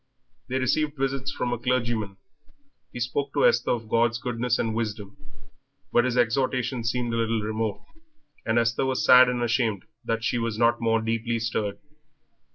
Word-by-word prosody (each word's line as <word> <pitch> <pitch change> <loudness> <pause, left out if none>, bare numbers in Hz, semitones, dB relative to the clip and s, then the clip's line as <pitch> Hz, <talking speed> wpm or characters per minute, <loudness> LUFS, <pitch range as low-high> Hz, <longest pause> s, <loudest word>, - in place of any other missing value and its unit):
They 130 +1 -1
received 145 +3 0
visits 135 0 -1
from 120 0 -2
a 120 - -3
clergyman. 115 -5 -1 0.7
He - - -7
spoke 135 +4 -2
to - - +3
Esther 120 +1 +3
of 115 -2 -1
God's 115 +1 +2
goodness 120 0 -1
and 110 -1 -1
wisdom, 105 -3 -4 0.8
but 120 - +4
his 125 -1 -1
exhortations 125 0 0
seemed 120 -1 -2
a - - 0
little 115 -1 0
remote, 110 0 -3 0.6
and 110 0 0
Esther 115 +3 +1
was 130 -1 0
sad 125 0 +8
and 120 -1 -1
ashamed 115 -4 0 0.2
that 115 0 -2
she 120 - 0
was 115 -2 -2
not 120 +1 +2
more 115 -1 +1
deeply 115 +1 -1
stirred. 110 -3 -2
115 Hz, 165 wpm, -25 LUFS, 115-125 Hz, 0.8 s, sad